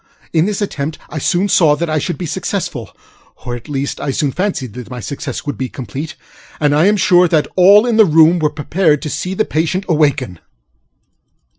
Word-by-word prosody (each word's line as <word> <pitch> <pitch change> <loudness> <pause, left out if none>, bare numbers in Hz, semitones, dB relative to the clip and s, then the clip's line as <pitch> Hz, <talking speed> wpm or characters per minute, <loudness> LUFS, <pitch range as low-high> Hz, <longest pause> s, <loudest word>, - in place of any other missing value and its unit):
In 160 0 +3
this 210 0 -2
attempt 155 -5 -4
I 155 - -4
soon 175 +7 +1
saw 160 -6 +4
that 170 +3 -3
I 155 -1 0
should 175 +4 -3
be 180 - -5
successfulŌĆöor 155 - -6
at 120 +5 -11
least 140 -1 -3
I - - -3
soon 140 +1 0
fancied 170 - -3
that 125 -1 -9
my 125 -1 -7
success 130 +4 -6
would 145 - -5
be 130 -1 -3
completeŌĆöand 145 +3 -5
I 155 +5 +4
am 210 +1 +3
sure 180 -2 +4
that 155 -2 +1
all 200 +4 +6
in 235 -2 +1
the 220 - +7
room 165 +1 +5
were 155 -2 +1
prepared 150 +1 0
to 150 - -4
see 185 +1 -3
the 215 - +1
patient 165 +5 -1
awaken. 145 - 0
155 Hz, 190 wpm, -16 LUFS, 140-180 Hz, -, the